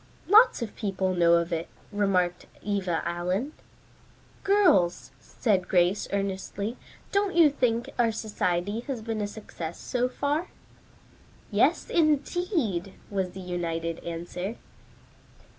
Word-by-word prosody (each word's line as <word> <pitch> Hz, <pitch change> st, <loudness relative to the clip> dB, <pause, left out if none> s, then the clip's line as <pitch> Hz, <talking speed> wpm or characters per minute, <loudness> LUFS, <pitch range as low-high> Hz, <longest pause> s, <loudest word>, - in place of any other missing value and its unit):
"Lots 430 Hz, -, +6 dB
of 220 Hz, -, -7 dB
people 190 Hz, -3 st, -1 dB
know 170 Hz, -1 st, +4 dB
of 170 Hz, +1 st, 0 dB
it," 165 Hz, 0 st, -3 dB, 0.2 s
remarked 185 Hz, -4 st, +1 dB, 0.2 s
Eva 190 Hz, -5 st, -1 dB
Allen. 180 Hz, -, -2 dB, 0.9 s
"Girls," 185 Hz, -, +3 dB
said 195 Hz, -6 st, 0 dB
Grace 180 Hz, +2 st, +2 dB
earnestly, 200 Hz, +2 st, -2 dB, 0.4 s
"don't 400 Hz, -2 st, +1 dB
you 325 Hz, -4 st, +7 dB
think 240 Hz, -4 st, 0 dB
our 230 Hz, -2 st, +4 dB
society 205 Hz, -2 st, -1 dB
has 255 Hz, -6 st, -4 dB
been 220 Hz, -1 st, -2 dB
a 205 Hz, -, -1 dB
success 175 Hz, -6 st, -7 dB
so 250 Hz, 0 st, -1 dB
far?" 290 Hz, +6 st, -1 dB, 1.0 s
"Yes, -, -, +2 dB
indeed," 300 Hz, -, +1 dB, 0.2 s
was 190 Hz, -2 st, -1 dB
the 190 Hz, -, -7 dB
united 165 Hz, -2 st, -3 dB
answer. 175 Hz, +5 st, -5 dB
200 Hz, 115 wpm, -27 LUFS, 175-245 Hz, 1.0 s, you